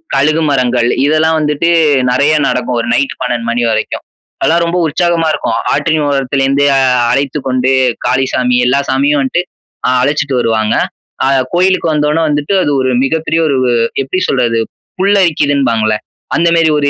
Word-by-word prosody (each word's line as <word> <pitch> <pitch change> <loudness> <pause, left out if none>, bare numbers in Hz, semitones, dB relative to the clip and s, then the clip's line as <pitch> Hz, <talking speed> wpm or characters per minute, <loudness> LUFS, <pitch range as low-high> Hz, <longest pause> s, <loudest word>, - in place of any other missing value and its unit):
கழுகு 155 +4 +2
மரங்கள் 125 -3 +1 0.2
இதெல்லாம் 155 +2 +2
வந்துட்டு 150 +2 0 0.4
நெறைய 140 +4 +2
நடக்கும். 125 -1 -1
ஒரு 115 - -5
நைட் 140 +2 -1
12:00 120 -2 -2
மணி 120 +1 -1
வரைக்கும். 110 -1 -2 0.4
அதெல்லாம் 170 +1 +2
ரொம்ப 170 +1 -1
உற்சாகமா 165 +1 0
இருக்கும். - - -2
ஆற்றின் 160 -2 0
ஓரத்திலேருந்து 135 0 0 0.5
அழைத்துக் 140 +1 -2
கொண்டு 130 0 0 0.3
காளிசாமி 130 -1 0
எல்லா 125 +3 +2
சாமியும் 140 +2 +1
வந்துட்டு 135 +6 -1 0.4
அ - - +2
அழைச்சுட்டு 145 0 -1
வருவாங்க. 110 -2 0 0.5
அ - - +2 0.3
கோயிலுக்கு 185 -2 +1
வந்த 150 -1 0
உடனே 165 +2 +1
வந்துட்டு 145 +4 -1
அது 145 - -1
ஒரு 130 - 0
மிகப்பெரிய 160 +3 -1
ஒரு 140 -3 0 0.5
எப்படி 185 +8 -3
சொல்றது 120 -3 +1 0.4
புல்லரிக்குதுன்பாங்கல்ல 145 - +1 0.4
அந்த 170 - +2
மாரி 165 -1 +3
ஒரு 145 -1 +1
140 Hz, 145 wpm, -13 LUFS, 125-160 Hz, 0.5 s, மாரி